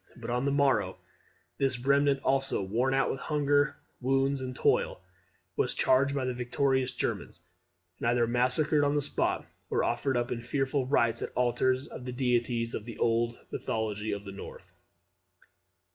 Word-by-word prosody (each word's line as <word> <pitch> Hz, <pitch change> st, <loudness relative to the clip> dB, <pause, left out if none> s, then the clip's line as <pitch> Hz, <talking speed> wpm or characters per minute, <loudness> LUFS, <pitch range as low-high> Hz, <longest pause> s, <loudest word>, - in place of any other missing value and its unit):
But -, -, -6 dB
on 125 Hz, +2 st, 0 dB
the 140 Hz, -, +2 dB
morrow 135 Hz, -10 st, +2 dB, 0.6 s
this 135 Hz, -2 st, +1 dB
remnant 140 Hz, +2 st, +2 dB
also, 135 Hz, -6 st, +2 dB
worn 120 Hz, +7 st, 0 dB
out 135 Hz, -, +2 dB
with 135 Hz, -, -4 dB
hunger, 145 Hz, -1 st, +1 dB, 0.2 s
wounds, 135 Hz, +1 st, +1 dB
and 130 Hz, -1 st, -5 dB
toil, -, -, +1 dB, 0.6 s
was -, -, 0 dB
charged 140 Hz, +2 st, +3 dB
by 135 Hz, -2 st, -1 dB
the 130 Hz, -, -1 dB
victorious 130 Hz, +1 st, 0 dB
Germans, -, -, -3 dB, 0.6 s
and -, -, -1 dB
either 120 Hz, 0 st, +3 dB
massacred 130 Hz, +6 st, +2 dB
on 145 Hz, +1 st, +2 dB
the 145 Hz, -, +2 dB
spot, -, -, 0 dB, 0.2 s
or -, -, +1 dB
offered 125 Hz, +2 st, 0 dB
up 120 Hz, 0 st, -1 dB
in 115 Hz, -, -2 dB
fearful 135 Hz, +2 st, -1 dB
rites 120 Hz, -4 st, +2 dB
at -, -, -5 dB
the -, -, -1 dB
alters 130 Hz, +2 st, +2 dB
of 125 Hz, -, -9 dB
the 125 Hz, -, -4 dB
deities 120 Hz, -2 st, 0 dB
of 105 Hz, -, -4 dB
the 115 Hz, -, -8 dB
old 115 Hz, 0 st, +1 dB
mythology 110 Hz, -1 st, -2 dB
of 100 Hz, 0 st, -4 dB
the 100 Hz, -, -7 dB
North. 100 Hz, -, -10 dB
130 Hz, 170 wpm, -29 LUFS, 120-135 Hz, 0.6 s, charged